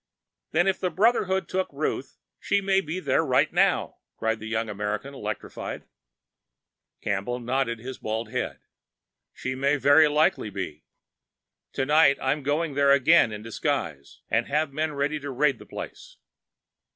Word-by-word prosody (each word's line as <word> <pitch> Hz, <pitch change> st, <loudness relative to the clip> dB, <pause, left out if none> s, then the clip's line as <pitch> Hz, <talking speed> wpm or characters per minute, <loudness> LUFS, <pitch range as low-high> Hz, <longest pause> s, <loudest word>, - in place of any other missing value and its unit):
"Then 175 Hz, -, +2 dB
if 195 Hz, -1 st, +1 dB
the 185 Hz, -, 0 dB
Brotherhood 190 Hz, -2 st, +2 dB
took 190 Hz, 0 st, -2 dB
Ruth, 140 Hz, -2 st, -3 dB, 0.2 s
she 200 Hz, -, +1 dB
may 195 Hz, -1 st, +2 dB
be 160 Hz, 0 st, -5 dB
at 185 Hz, -, -7 dB
that 135 Hz, -, +3 dB
place -, -, +4 dB
now!" -, -, +1 dB, 0.2 s
cried 110 Hz, 0 st, -1 dB
the 110 Hz, -, -7 dB
young 115 Hz, 0 st, -1 dB
American, 105 Hz, +6 st, -4 dB
electrified. 135 Hz, -, -5 dB, 1.2 s
Campbell 100 Hz, +5 st, -2 dB
nodded 125 Hz, 0 st, -1 dB
his 125 Hz, +3 st, -8 dB
bald 110 Hz, +1 st, -3 dB
head. -, -, -3 dB, 0.7 s
"She 130 Hz, -, -4 dB
may 140 Hz, +2 st, +1 dB
very 145 Hz, +3 st, +6 dB
likely 150 Hz, -7 st, +2 dB
be. 95 Hz, -6 st, -6 dB, 0.9 s
Tonight 140 Hz, +1 st, +4 dB
I'm 140 Hz, +3 st, 0 dB
going 145 Hz, +3 st, -1 dB
there 140 Hz, 0 st, +3 dB
again 140 Hz, -1 st, +5 dB
in 105 Hz, 0 st, -7 dB
disguise, 115 Hz, -, -3 dB
and 115 Hz, +1 st, +1 dB
have 150 Hz, 0 st, 0 dB
men 155 Hz, +1 st, -1 dB
ready 145 Hz, +2 st, -1 dB
to 145 Hz, 0 st, -6 dB
raid 135 Hz, +1 st, +1 dB
the -, -, -13 dB
place. -, -, -9 dB
140 Hz, 150 wpm, -26 LUFS, 115-155 Hz, 1.2 s, very